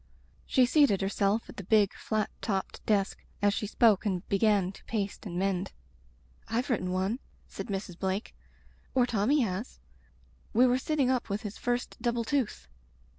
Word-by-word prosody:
" - - -34
She 255 - +4
seated 265 -7 +4
herself 200 +2 +1
at - - -12
the 200 - -5
big 205 +1 +3
flat 215 -1 -2
topped 195 -3 -2
desk 200 -2 +1 0.2
as 205 0 +3
she 210 - -2
spoke 215 -2 +4
and 190 -5 -2
began 200 -2 +3
to - - -15
paste 205 -1 -3
and 175 -2 -5
mend. 190 0 -1 0.8
"Fve 240 +4 -1
written 190 -7 0
one," 190 +6 0 0.3
said - - -7
Mrs. 195 -4 -5
Blake, 190 +2 -2 0.6
"or 250 -2 +5
Tommy 245 +5 +2
has. 210 +1 -3 0.7
We 240 +3 +6
were 250 0 +3
sitting 275 -2 +1
up 250 -3 -1
with 200 +3 -2
his 210 -1 -6
first 245 -1 -2
double 235 -1 0
tooth. 255 - -1
210 Hz, 170 wpm, -29 LUFS, 195-240 Hz, 0.8 s, We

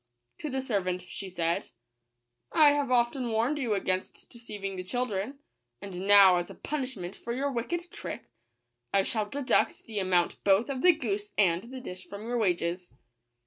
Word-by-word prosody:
To 305 - -4
the 265 -1 -2
servant 185 -7 -1
she 190 +1 -7
said, 170 -2 -1 0.4
" 120 0 -54
I 305 -3 +7
have 285 -2 0
often 245 0 +2
warned 235 +7 +1
you 235 -6 0
against 185 -1 -3
deceiving 205 -5 -6
the 185 - -4
chil 245 +7 -1
dren; 215 +5 -4 0.4
and 195 -1 -6
now, 200 -3 +8
as 175 - -2
a - - -10
punishment 255 -11 -4
for 235 - -5
your 275 +3 -1
wicked 345 +9 -3
trick, - - -7 0.6
I 195 - +3
shall 210 0 -1
deduct 280 +2 +1
the 215 -2 -4
amount 180 -2 +1
both 200 +6 +4
of 260 -2 -3
the 360 -1 +7
goose 400 +5 -3
and 180 -1 +3
the 255 +2 -8
dish 185 -6 -8
from 200 +1 -8
your 240 +1 -1
wages." 175 -3 0
210 Hz, 180 wpm, -29 LUFS, 185-260 Hz, 0.6 s, now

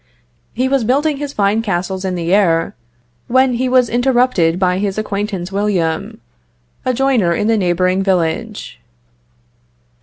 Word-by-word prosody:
He 255 +3 0
was 270 -2 +1
building 285 +5 +1
his 290 0 -5
fine 205 -1 +1
castles 190 -2 -3
in 185 -1 -2
the 170 +1 -1
air, 170 -5 +2 0.5
when 260 +1 +3
he 255 +2 -1
was 250 -1 +3
interrupted 240 -8 +2
by 180 -1 +1
his 200 -1 -2
acquaintance 200 -3 -3
William, 190 -6 -1 0.6
a 255 - +1
joiner 245 -9 +1
in 210 - -1
the 225 +1 +2
neighboring 185 -1 +1
village. 195 +3 -2
205 Hz, 140 wpm, -16 LUFS, 180-245 Hz, 0.6 s, when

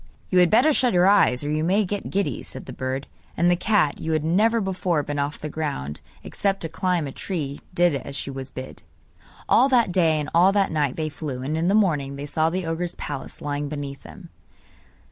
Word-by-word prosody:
'You 185 - +5
had 180 -1 +5
better 255 - +5
shut 250 -7 +2
your 180 0 +5
eyes 190 -10 +4
or 145 - -2
you 155 +1 0
may 195 +5 +2
get 205 +2 -4
giddy,' 200 0 -1
said 130 - -9
the - - -8
bird; 130 +1 -3 0.3
and 175 +2 +4
the - - +4
cat, 180 -5 +1
you 160 - -1
had 155 -1 0
never 215 +8 +3
before 185 -5 -1
been 145 0 -3
off 145 +1 -2
the 155 - -5
ground 145 - -4 0.2
except 195 -1 -1
to 165 - -3
climb 175 0 0
a 135 - -5
tree, 145 -4 -4
did 175 -2 +4
as 140 0 -5
she 140 - -3
was 135 -1 -6
bid. 130 0 -8 0.7
All 270 - +5
that 240 -7 +3
day 165 -4 +3
and 150 - -3
all 180 +3 +5
that 200 -1 +2
night 145 -4 0
they 155 -1 -2
flew, 145 -4 -6
and 150 +4 -2
in 165 +2 0
the 195 - +3
morning 150 -10 +1
they 140 +1 -6
saw 155 +2 +1
the 180 +1 -3
ogre's 170 +2 -3
palace 140 -2 -7
lying 145 0 -2
beneath 140 -2 -6
them. - - -12
160 Hz, 220 wpm, -24 LUFS, 145-185 Hz, 0.7 s, You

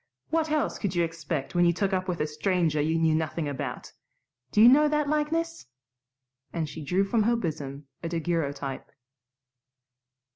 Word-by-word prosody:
What 320 -1 +1
else 305 -1 0
could 195 -4 -2
you 175 - +3
expect 160 -4 -3
when 175 0 +3
you 170 0 +4
took 195 +2 -1
up 185 0 0
with 180 -2 -2
a - - +2
stranger 155 0 0
you 160 +2 +1
knew 160 -1 +3
nothing 160 0 -1
about? 140 -2 -5 0.6
Do 210 - +1
you 225 - +9
know 295 +4 +7
that 300 -1 +1
likeness?" 325 - -1 0.8
and 165 -2 -2
she 155 +1 -7
drew 180 +7 +2
from 220 +3 +1
her 235 +3 +3
bosom 145 -8 -4 0.2
a 165 - -3
daguerreotype. 155 -5 -2
170 Hz, 170 wpm, -27 LUFS, 155-225 Hz, 0.8 s, you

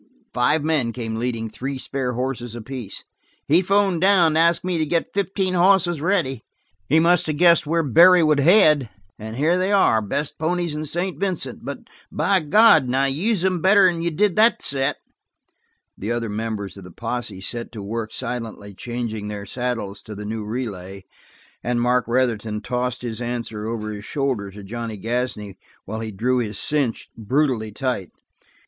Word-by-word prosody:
Five 145 +5 +2
men 150 -7 +1
came 115 -2 -4
leading 115 -1 -2
three 135 +5 -5
spare 130 -1 -3
horses 120 -1 -3
apiece. 120 -1 -6 0.4
"He 160 +5 +5
phoned 195 -2 +2
down 190 -3 +5
and 155 - 0
asked 170 +1 +3
me 180 -2 -1
to 155 - +1
get 165 +2 -1
fifteen 195 -1 -1
hosses 175 -3 +3
ready. 165 - 0 0.5
He 155 - +5
must 170 0 +3
of 150 - -1
guessed 170 -2 +5
where 165 +1 +1
Barry 170 +5 +6
would 155 -2 +3
head. 150 - +5 0.3
And 110 +1 -7
here 160 +7 +2
they 190 +2 0
are 190 - +4
the 105 - -7
best 145 +7 -2
ponies 170 0 -1
in 155 +1 -4
St. 175 +5 -2
Vincent 190 -2 -2
but - - -6 0.3
for 195 -1 +2
God's 160 - +5
sake 135 +1 +1
use 190 +3 +1
'em 185 -3 0
better'n 185 -3 +4
you 170 - 0
did 185 +4 +1
that 225 +2 +4
set!" 135 -1 +1 1.0
The 105 +4 -4
other 120 -1 -2
members 105 -2 -4
of 100 - -10
the 90 - -11
posse 115 +1 -5
set 115 +5 -4
to 105 -3 -7
work 110 +2 -4
silently 115 -5 -5
changing 115 -1 -5
their 105 -1 -6
saddles 115 -3 -4
to 105 - -9
the 105 +1 -7
new 110 +1 -4
relay, 100 -5 -5 0.6
and 120 0 0
Mark 125 0 +1
Retherton 115 -4 0
tossed 125 +2 -3
his 115 -1 -4
answer 115 -3 -4
over 110 -2 -4
his 105 0 -7
shoulder 130 -8 -2
to 100 +1 -11
Johnny 115 +1 -5
Gasney 110 -3 -3 0.3
while 110 +3 -5
he 110 0 -4
drew 125 +6 0
his 105 -4 -3
cinch 140 -7 -1
brutally 115 -1 0
tight. 105 -4 -3
125 Hz, 175 wpm, -22 LUFS, 110-165 Hz, 1.0 s, Barry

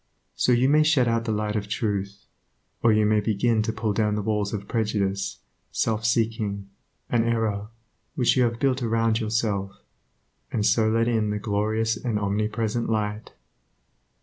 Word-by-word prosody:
So - - +1
you 125 +2 +4
may 150 +2 +5
shut 155 -5 +3
out 115 0 0
the 115 - -1
light 105 0 -1
of 105 -1 -2
Truth, 100 -3 -3 0.6
or 115 - +4
you 110 0 +3
may 105 0 +3
begin 110 +2 +1
to 110 - -1
pull 110 -1 -2
down 105 0 +1
the 105 - -2
walls 105 -1 -1
of 100 -2 -5
prejudice, 100 -3 -1 0.3
self 110 0 -1
seeking 110 -3 -1 0.4
and 120 -2 +2
error 110 -3 -1 0.5
which 125 -6 +3
you 130 - +3
have 115 -1 +1
built 135 -1 +1
around 115 -1 +1
yourself, 105 -3 -1 0.7
and 105 -2 0
so 110 +1 +3
let 115 +1 +2
in 110 -3 +1
the 105 - -1
glorious 110 +2 0
and 115 -2 -2
omnipresent 105 +3 -1
Light. 105 -1 -2
110 Hz, 165 wpm, -25 LUFS, 105-115 Hz, 0.7 s, may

